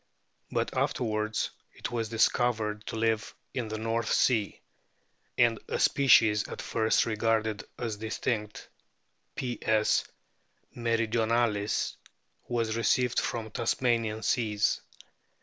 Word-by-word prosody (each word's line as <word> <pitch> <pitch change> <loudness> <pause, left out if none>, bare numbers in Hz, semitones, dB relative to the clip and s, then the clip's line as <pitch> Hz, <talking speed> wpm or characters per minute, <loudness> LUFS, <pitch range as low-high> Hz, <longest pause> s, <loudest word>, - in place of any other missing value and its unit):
But - - -2
afterwards 110 -2 -1 0.2
it - - -5
was 115 -2 -2
discovered 110 -2 +1
to - - -4
live 110 -1 0 0.2
in 120 -3 -2
the 110 0 -4
North 115 +1 -1
Sea, 110 -5 +2 0.8
and 115 -2 +4
a - - -2
species 110 -6 +4
at - - -7
first 110 -1 +1
regarded 110 -1 0
as 115 -3 -3
distinct, 110 0 -3 0.7
Ps. 110 -4 +1 0.7
meridionalis, 115 -2 0 0.5
was 115 -2 -1
received 120 +2 +2
from 110 -2 -3
Tasmanian 115 -1 0
seas. 105 -2 +1
115 Hz, 100 wpm, -29 LUFS, 110-115 Hz, 0.8 s, and